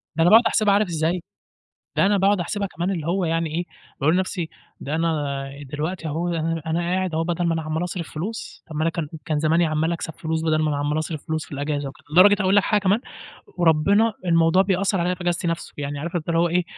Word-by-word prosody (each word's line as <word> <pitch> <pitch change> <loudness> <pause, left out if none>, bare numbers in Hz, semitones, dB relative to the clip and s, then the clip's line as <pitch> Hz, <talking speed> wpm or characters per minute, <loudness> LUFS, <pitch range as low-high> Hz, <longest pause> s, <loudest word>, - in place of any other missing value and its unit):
ده 165 - +1
أنا 175 - +5
باقعُد 225 +2 +7
أحسبها 210 -2 +3
عارف 205 0 +3
إزاي، 170 +2 -1 0.8
ده - - +5
أنا 205 0 +3
باقعُد 195 +1 +3
أحسبها 200 +3 -2
كمان 175 +2 -3
اللي 165 -4 -3
هو 180 +1 +1
يعني 165 0 0
إيه، 175 - 0 0.4
باقول 155 +5 +3
لنَفْسي، 185 -3 -1 0.3
ده 145 +3 -3
أنا 145 -4 -1 0.2
دلوقتي 160 +3 -3
أهو 160 +3 -2
أنا 165 -1 -1
أنا 160 +1 0
قاعد 180 0 -1
أهو 160 +1 +1
بَدَل 175 +1 -1
ما 170 - +2
أنا 160 - -1
عَمّال 155 +2 -2
أصرف 175 -1 -5
فلوس، 210 +9 -6
طَب 160 - -9
ما 155 - -1
أنا 165 - +2
كان 165 -2 -4 0.2
كان 155 -2 0
زماني 160 +3 +3
عَمّال 155 +1 0
أكسب 165 -1 -4
فلوس 160 0 -3
بَدَل 155 -1 +2
ما 155 - +1
أنا 145 - -1
عَمّال 145 +2 0
أصرف 155 -1 -5
فلوس 160 -1 -2
في - - -20
الإجازة 145 0 -2
وكده، 135 - -16
لدرجة 195 +5 +7
أقول 190 +1 +3
لك 205 - +5
حاجة 210 -1 +2
كمان، 200 +3 +3 0.6
وربِّنا 185 +7 +3
الموضوع 165 +1 +4
بيأثّر 195 0 +1
عليّا 180 +1 +1
في 180 - -13
إجازتي 175 0 -1
نَفْسه. 165 0 -3
يعني 145 0 -4
عارف 170 +4 -5
أنت 170 -1 -2
هو 170 +1 +3
إيه، 180 +1 +2
165 Hz, 235 wpm, -23 LUFS, 155-185 Hz, 0.8 s, باقعُد